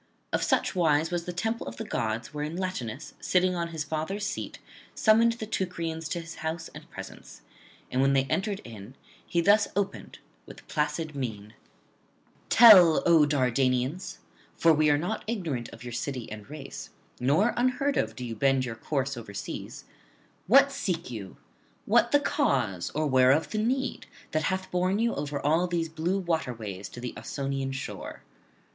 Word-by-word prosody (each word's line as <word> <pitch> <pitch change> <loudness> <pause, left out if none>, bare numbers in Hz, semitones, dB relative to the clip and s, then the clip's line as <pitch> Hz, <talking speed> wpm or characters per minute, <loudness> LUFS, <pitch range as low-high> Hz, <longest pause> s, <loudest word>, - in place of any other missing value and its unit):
Of - - +1
such - - +1
wise 160 -2 +2
was 175 -1 -2
the 180 - -3
temple 225 +6 -2
of 115 0 -7
the - - -4
gods 115 +2 -3
wherein 150 +2 -4
Latinus, 155 -9 -4
sitting 185 0 +2
on 170 -1 -2
his 160 -2 -4
father's 160 +7 -3
seat, 215 - -4 0.4
summoned 230 +1 +4
the 230 -1 -6
Teucrians 170 -6 -3
to 170 - -2
his 165 -1 -10
house 160 +1 -3
and - - -12
presence; - - -10 0.5
and 130 - +1
when 135 0 +4
they 135 -1 +4
entered 195 +8 -2
in, 115 +1 -10 0.3
he 170 - 0
thus 205 +4 +5
opened 200 -1 -3 0.3
with - - -13
placid 155 +1 -1
mien: 110 -6 -5 1.0
'Tell, 190 -9 +8
O 165 -3 +6
Dardanians, 130 +3 0 0.4
for 165 -1 +5
we 155 0 +3
are 145 - +4
not 175 +9 -3
ignorant 165 - -3
of - - -12
your 120 -1 -7
city 125 -1 -4
and 105 +1 -9
race, 150 -1 -8 0.3
nor 150 - +3
unheard 255 +3 +1
of 110 0 -1
do 125 - -6
you 115 -1 -5
bend 135 +2 +2
your 120 - -4
course 135 +3 -2
[197 105 -4 -6
228]overseas, - - -11 0.6
what 275 +6 +6
seek 180 - -3
you? 100 -5 -7 0.5
what - - +4
the - - +5
cause 90 -3 0
or 155 +1 +1
whereof 130 +2 +4
the 215 - -1
need 260 +5 -1 0.2
that 155 0 0
hath 190 0 -2
borne 185 +2 +1
you 230 +1 +1
over 145 0 -3
all 160 +6 +2
these 170 -2 -1
blue 165 +4 -1
waterways 115 - -3
to - - -10
the 120 -1 -5
Ausonian 135 -1 -3
shore? 130 0 -6
155 Hz, 170 wpm, -28 LUFS, 130-185 Hz, 1.0 s, Tell